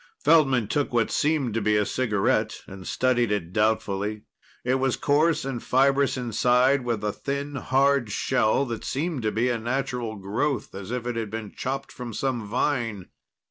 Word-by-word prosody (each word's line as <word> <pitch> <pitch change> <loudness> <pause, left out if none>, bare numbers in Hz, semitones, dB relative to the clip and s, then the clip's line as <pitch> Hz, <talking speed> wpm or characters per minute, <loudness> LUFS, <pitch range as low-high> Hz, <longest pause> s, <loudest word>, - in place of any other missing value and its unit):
Feldman 135 -9 +4
took 145 +5 0
what 120 -2 +1
seemed 145 -6 +1
to 115 - 0
be 105 +1 +2
a 105 - +2
cigarette 105 -6 0
and 95 -1 -10
studied 120 -3 +1
it 90 -4 -2
doubtfully. 105 -1 0 0.4
It 130 +1 +2
was 135 -1 +1
coarse 150 +1 +2
and 130 -4 -3
fibrous 135 +1 +2
inside, 125 +3 +2
with 115 -4 -2
a 105 - 0
thin, 140 +3 -4
hard 135 -4 +2
shell 130 +3 +1
that 115 -3 -5
seemed 150 0 -2
to 110 -1 0
be 115 +4 +1
a 120 -2 0
natural 120 -1 -2
growth, 110 +8 -2
as 95 0 -7
if 125 0 -3
it 120 -1 -2
had 110 -2 -3
been 110 -1 -6
chopped 135 +1 -4
from 120 -2 -7
some 120 -6 -2
vine. 115 -5 -1
120 Hz, 175 wpm, -25 LUFS, 110-135 Hz, 0.4 s, Feldman